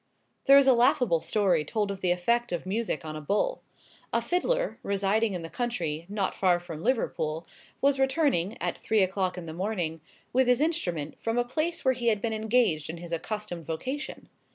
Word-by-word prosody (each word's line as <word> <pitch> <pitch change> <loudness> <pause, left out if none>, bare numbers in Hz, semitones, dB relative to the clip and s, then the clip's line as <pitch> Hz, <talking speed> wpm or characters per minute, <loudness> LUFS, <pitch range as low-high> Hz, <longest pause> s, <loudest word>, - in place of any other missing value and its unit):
There 275 +1 +9
is 280 - +6
a 265 - +7
laughable 235 -7 +3
story 190 -7 +2
told 205 +6 -1
of 195 -1 -6
the 180 - +1
effect 235 +7 +1
of 175 0 -3
music 200 -4 -2
on 155 0 -5
a 155 - -5
bull. 210 - 0 0.5
A - - +2
fiddler, - - 0
residing 200 +2 +1
in 175 -2 -4
the - - -5
country, 170 -10 -3
not 200 -2 -1
far 180 -2 +3
from 170 -3 -8
Liverpool, 165 -10 -1 0.4
was 275 0 +3
returning, 265 - +1
at - - -1
three 220 -3 +2
o'clock 185 -1 -1
in 175 - -6
the 160 - -6
morning, 175 -4 -2 0.3
with 260 0 +3
his 250 0 +4
instrument, 180 - -1
from 225 +1 -1
a 245 - +2
place 310 +6 -2
where 260 - +5
he 240 -1 -3
had 215 -3 +3
been 225 +2 -2
engaged 220 -9 +1
in 165 - -5
his 170 0 -9
accustomed 175 -1 -4
vocation. 260 - -4
205 Hz, 195 wpm, -28 LUFS, 170-245 Hz, 0.5 s, There